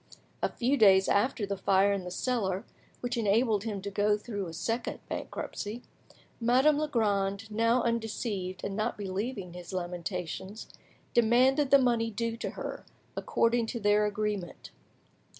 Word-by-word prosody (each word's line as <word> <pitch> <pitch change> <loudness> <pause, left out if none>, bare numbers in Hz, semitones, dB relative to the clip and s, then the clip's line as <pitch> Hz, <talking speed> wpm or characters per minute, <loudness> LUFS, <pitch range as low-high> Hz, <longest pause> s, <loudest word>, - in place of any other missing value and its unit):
A - - +1
few 260 +4 0
days 195 -4 +6
after 215 +1 +2
the 200 0 -2
fire 195 +1 +3
in 195 -2 -3
the - - -4
cellar, 195 -2 -1 0.4
which 245 -1 -2
enabled 220 -1 +2
him 205 -4 -4
to 200 - -4
go 210 +1 +2
through 205 -3 -5
a 165 - -8
second 225 +8 -2
bankruptcy, 220 +4 -5 0.6
Madame 260 +6 +4
Legrand, 210 -7 0
now 230 +3 +2
undeceived 220 -5 -2
and 195 - -3
not 215 - -1
believing 195 -1 -4
his 180 +1 -9
lamentations, 180 +2 -4 0.5
demanded 255 +5 +4
the 280 - +8
money 235 -3 +2
due 230 +1 -2
to - - -3
her, - - -6 0.3
according 235 - +1
to 235 - -4
their 210 0 +3
agreement. 210 -3 -3
210 Hz, 145 wpm, -29 LUFS, 195-235 Hz, 0.6 s, the